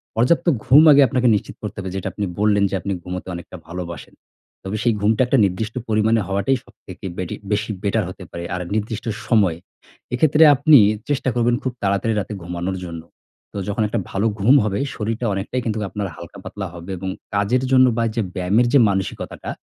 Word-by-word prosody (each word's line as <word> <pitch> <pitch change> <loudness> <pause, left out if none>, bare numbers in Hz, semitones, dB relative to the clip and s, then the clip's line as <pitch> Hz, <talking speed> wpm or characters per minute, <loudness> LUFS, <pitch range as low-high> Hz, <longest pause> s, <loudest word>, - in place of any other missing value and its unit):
পর্যাপ্ত 125 +11 +2 0.2
ঘুম 145 +5 +7
আগে 145 0 +7
আপনাকে 125 +1 +1
নিশ্চিত 105 - -4
করতে 105 -1 -6
হবে। 95 -1 -4
যেটা 95 - -3
আপনি 105 - -2
বললেন, 105 -1 +3
যে - - -2
আপনি 100 - -3
ঘুমোতে 90 +1 -6
অনেকটা 85 +1 -9
ভালোবাসেন। 85 -2 -7 0.5
তবে 95 +2 -4
সেই 120 - +3
ঘুমটা 110 +4 +2
একটা 135 - +3
নির্দিষ্ট 105 +5 -3
পরিমাণে 110 0 +2
হওয়াটাই 100 +7 +1
সবথেকে - - -13
বেটি 90 -2 -4 0.2
বেশি 105 +1 0
বেটার 100 - +1
হতে 95 0 -10
পারে, 85 - -6
আর 90 - -4
নির্দিষ্ট 110 0 -3 0.2
সময়। 100 -8 +2 0.6
এক্ষেত্রে 150 +4 +4
আপনি, 145 +2 +6 0.3
চেষ্টা 135 -2 0
করবেন 120 0 +2
খুব 130 - -1
তাড়াতাড়ি 100 +3 +1
রাতে 105 +1 -5
ঘুমানোর 90 +2 -3
জন্য। 85 -2 -7 0.5
তো, - - -6
যখন 105 +2 -2
একটা 110 +2 -2
ভালো 100 +3 -1
ঘুম 120 +8 +5
হবে, 100 -2 -1 0.2
শরীরটা 115 +2 -3
অনেকটাই 100 +6 -3
কিন্তুক 110 -1 -1
আপনার 105 -2 -3
হালকা 85 -1 -11
পাতলা 100 -2 -6
হবে 85 +2 -8
এবং 95 +1 -4 0.3
কাজের 110 +6 +1
জন্য 130 0 +6
বা 115 - +2
এই - - -3
যে 115 - +1
ব্যায়ামের 100 +7 +2
যে 140 - +7
মানসিকতাটা, 95 -1 -4
105 Hz, 190 wpm, -21 LUFS, 95-120 Hz, 0.6 s, ঘুম